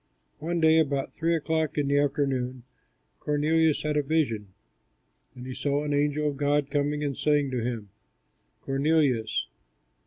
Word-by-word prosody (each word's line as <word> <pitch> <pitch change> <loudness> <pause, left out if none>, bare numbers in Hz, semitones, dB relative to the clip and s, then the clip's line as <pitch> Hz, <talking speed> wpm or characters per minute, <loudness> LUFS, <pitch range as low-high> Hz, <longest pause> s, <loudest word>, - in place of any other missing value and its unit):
One 170 +3 -2
day, 160 0 +5
about 140 -3 0
three 165 +1 0
o'clock 160 -1 -1
in 145 -1 +1
the 140 0 +3
afternoon, 135 -3 -1 0.6
Cornelius 155 +1 +1
had 150 0 -1
a - - +3
vision; 140 -9 0 0.9
and 125 - -9
he 130 - -5
saw 145 +2 -1
an 145 -1 -2
angel 145 +1 +1
of 145 -2 -2
God 145 0 +1
coming 145 0 0
and 140 -2 -2
saying 145 -1 +1
to 125 -3 -2
him, 115 -5 -4 0.7
"Cornelius." 135 -5 +1
145 Hz, 150 wpm, -27 LUFS, 135-150 Hz, 0.9 s, day